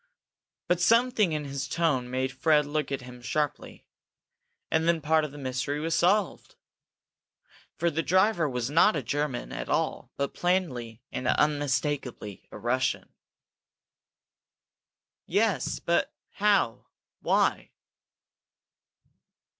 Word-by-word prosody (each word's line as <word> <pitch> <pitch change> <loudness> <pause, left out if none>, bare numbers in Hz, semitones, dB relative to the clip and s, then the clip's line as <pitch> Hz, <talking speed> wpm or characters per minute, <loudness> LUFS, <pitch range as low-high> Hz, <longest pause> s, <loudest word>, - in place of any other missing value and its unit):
But 175 0 +1
something 230 -2 +3
in 150 -1 -2
his 140 0 -4
tone 145 -8 0
made 130 +1 -1
Fred 150 +3 +3
look 150 -1 -2
at 135 -1 -2
him 125 0 -11
sharply. 150 +4 -3 0.9
And 160 +1 +2
then 170 -1 +3
part 155 +1 +2
of 150 - -4
the 145 - -11
mystery 135 +2 -2
was 165 +2 -1
solved. 195 +3 +1 1.2
For 170 0 +1
the 160 +2 0
driver 185 -2 +2
was 125 0 -3
not 165 +6 +5
a 145 - -2
German 140 +1 -2
at - - -5
all, - - -1
but 140 0 -2
plainly 125 - -1
and 130 - -3
unmistakably 140 -7 -1
a - - -8
Russian. 130 +4 -1 2.1
"Yes 205 +3 +1
but 170 - 0 0.2
how 200 - +1 0.3
why - - +1
150 Hz, 115 wpm, -27 LUFS, 130-170 Hz, 2.1 s, not